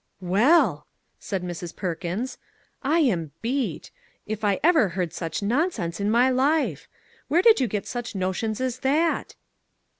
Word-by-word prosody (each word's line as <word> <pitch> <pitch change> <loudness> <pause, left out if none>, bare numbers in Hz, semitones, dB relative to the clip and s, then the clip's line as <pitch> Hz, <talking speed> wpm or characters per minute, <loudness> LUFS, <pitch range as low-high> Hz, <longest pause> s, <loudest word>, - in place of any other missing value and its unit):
" - - -49 0.2
Well! 320 +9 +4
" - - -47
said 195 -3 -4
Mrs. 175 -1 -6
Perkins, 180 +7 -4 0.2
" - - -40 0.2
I - - +4
am 170 - 0
beat! 260 +3 -2 0.3
if 215 0 -4
ever 260 - +3
I 180 - -5
heard 180 -3 -2
such 165 +3 -4
nonsense 220 - -1
in 200 +1 0
my 240 +3 +4
life! 260 - +1 0.4
Where 345 +4 +2
did 450 -1 +6
you 255 - +2
get 205 -2 -3
such 240 -3 -5
notions 195 +4 -2
as 255 -1 -2
that 305 +6 0
220 Hz, 160 wpm, -25 LUFS, 185-265 Hz, 0.4 s, did